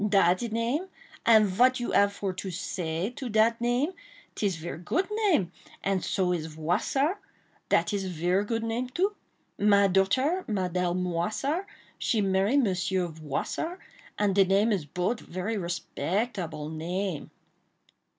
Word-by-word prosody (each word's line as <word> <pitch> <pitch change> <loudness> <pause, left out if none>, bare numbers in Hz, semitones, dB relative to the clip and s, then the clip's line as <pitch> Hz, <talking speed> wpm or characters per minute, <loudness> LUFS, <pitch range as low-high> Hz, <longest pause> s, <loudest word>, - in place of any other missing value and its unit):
"Dat 185 -2 +4
name! 240 - 0 0.4
and 220 -2 +7
vat 250 +7 +3
you 240 - -3
ave 200 0 +5
for 195 -2 -4
say 180 0 -3
to 255 0 -6
dat 225 +2 +3
name? 245 +7 +1 0.4
'Tis 200 -4 0
ver 165 0 -6
goot 325 - 0 0.2
name; 195 - +2 0.3
and 195 -2 0
so 180 -2 +1
is 160 -2 -2
Voissart—dat 250 - -1
is 195 -1 -1
ver 180 +3 +1
goot 225 +2 -2
name 235 +2 -2
too. 375 +10 0 0.5
My 200 -1 +5
daughter, 255 - +2
Mademoiselle 180 -3 0
Moissart, 185 - -1 0.3
she 225 - +1
marry 195 +4 +2
von 285 - +5
Monsieur 185 -3 0
Voissart,—and 195 - -3
de 195 0 +6
name 200 +4 +3
is 190 -8 0
bot 180 - -1
ver 185 +5 -4
respectable 175 -2 -2
name." 170 +2 -3
195 Hz, 130 wpm, -28 LUFS, 180-235 Hz, 0.5 s, and